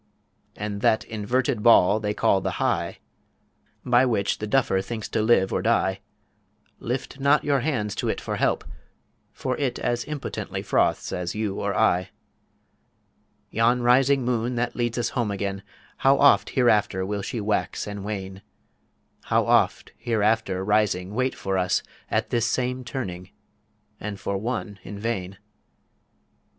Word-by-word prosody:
And 105 -1 -4
that 110 - +3
inverted 120 +3 -1
Ball 105 -2 +6
they 105 -1 -2
call 95 - +2
the - - -2
High - - -1 0.9
By 125 0 +4
which 110 -6 0
the 105 - -4
Duffer 105 -5 +2
thinks 110 +1 -5
to - - 0
live 110 -4 +3
or - - 0
die, - - +1 0.8
Lift 130 +3 -4
not 140 +2 +3
your 140 -2 +2
hands 120 -8 -1
to - - -1
IT - - -1
for - - -4
help, - - +1 0.7
for 130 - -3
it 135 -4 -1
As 120 0 -1
impotently 150 -2 -5
froths - - +1
as 90 +1 -3
you 105 -2 -2
or - - -1
I. 90 0 +2 1.4
Yon 120 +2 +2
rising 130 +2 +4
Moon 120 0 0
that 120 +1 -1
leads 120 -1 -1
us 120 -1 0
Home 120 -4 -1
again, 100 -1 -3 0.4
How 135 +1 +4
oft 100 -8 +5
hereafter 105 -7 +2
will 100 +1 -2
she 120 +4 -4
wax 105 0 -1
and 100 -1 -6
wane; 95 -2 -5 0.8
How - - +2
oft - - +2
hereafter 110 -4 0
rising 105 -2 +1
wait 130 +3 0
for 95 -1 -1
us 90 -1 +1 0.3
At - - -1
this 120 -1 +1
same 125 +1 -1
Turning 95 -8 -5 0.7
and 105 -2 -5
for 100 - -3
One 105 -1 -3
in 100 - -8
vain. 100 -3 -3
110 Hz, 150 wpm, -25 LUFS, 100-125 Hz, 1.4 s, Ball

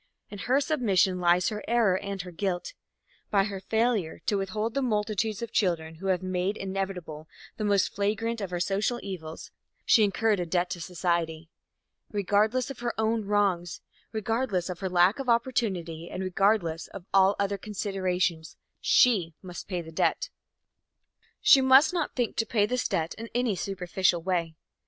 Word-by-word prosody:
In 205 - -7
her 260 +7 +2
submission 215 - +2
lies 175 0 +3
her 210 -1 -5
error 230 -5 +3
and 195 -1 -4
her 180 - -9
guilt. 180 - -3 0.6
By 200 -2 +3
her 200 -1 -4
failure 220 -4 0
to 205 - +1
withhold 210 +3 -2
the 275 - 0
multitudes 215 -2 -1
of 235 - -6
children 160 -5 0
who 195 - -3
have 185 -1 +1
made 185 +2 -1
inevitable 190 -5 -4 0.3
the 215 - -3
most 200 -2 +2
flagrant 220 +3 -1
of 195 -2 -4
our 175 - -2
social 200 +7 0
evils, 165 -5 -7 0.3
she 220 - +5
incurred 210 +1 +2
a 175 - -1
debt 175 +1 0
to 175 - -4
society. 165 -2 -2 0.6
Regardless 215 +5 +1
of 270 - -9
her 240 -1 -3
own 220 -1 +1
wrongs, 195 -4 0 0.3
regardless 220 -4 -1
of 175 - -7
her 190 - -2
lack 180 +6 +3
of 265 -2 -3
opportunity 190 -9 0
and 190 - -4
regardless 185 -3 +1
of 195 -3 -10
all 195 +1 +5
other 200 0 -1
considerations, 185 -5 -2 0.2
she 185 -10 +3
must 180 -1 -8
pay 180 -3 -3
that 160 0 -11
debt. - - 0 1.1
She 270 - +7
must 265 +6 +6
not 340 -4 -2
think 245 -3 -1
to 225 - 0
pay 210 -3 +2
this 250 +4 -1
debt 160 0 -1
in 230 0 -7
any 245 -4 +1
superficial 180 -2 0
way. 170 -3 -1
195 Hz, 165 wpm, -27 LUFS, 180-220 Hz, 1.1 s, She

